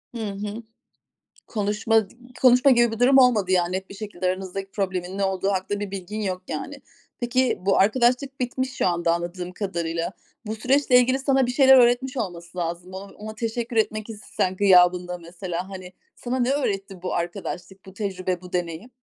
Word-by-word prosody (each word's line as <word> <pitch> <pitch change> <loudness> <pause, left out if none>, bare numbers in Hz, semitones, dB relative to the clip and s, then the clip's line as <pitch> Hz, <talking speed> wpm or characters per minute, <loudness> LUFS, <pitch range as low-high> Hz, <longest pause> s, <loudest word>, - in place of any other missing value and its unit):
Hı - - -4
hı. 205 +3 -6 0.8
Konuşma 210 0 +1
d - - -16 0.3
konuşma 255 +2 +6
gibi 240 -2 +4
bir 225 - -5
durum 265 +2 +6
olmadı. 215 -7 +4
Ya, 175 -2 +3
net 190 +1 -4
bir - - -8
şekilde 200 -3 -5
aranızdaki 190 +1 -3
problemin 185 -1 -3
ne 200 - +1
olduğu 190 0 -1
hakkında 200 +2 -2
bir 205 -2 -4
bilgin 195 +2 -5
yok 185 -2 -3
yani. 275 - -5 0.4
Peki, 250 +1 +1
bu 195 +1 +2
arkadaşlık 250 +6 +2
bitmiş 255 +1 -2
şu - - +1
anda 170 -1 +1
anladığım 175 +1 -5
kadarıyla. 170 -3 -3 0.3
Bu 215 - -3
süreçle 255 +2 +4
ilgili 255 +2 +3
sana 270 -2 +2
bir - - -1
şeyler 265 0 +7
öğretmiş 250 +2 +3
olması 175 -5 -5
lazım. 175 +2 -4
O - - -4
ona 210 +2 -9
teşekkür 230 +1 -3
etmek 215 0 0
istesen 190 -3 -3
gıyabında 180 -2 +4
mesela 175 +1 -6
hani, 185 -1 -9 0.2
sana 255 +1 -3
ne 250 +1 +1
öğretti 195 -9 -2
bu 185 - -3
arkadaşlık, 185 +2 -5
bu 190 - -11
tecrübe, 185 -3 -3
bu 180 -1 -12
deneyim? 175 +6 -4
195 Hz, 175 wpm, -24 LUFS, 180-240 Hz, 0.8 s, şeyler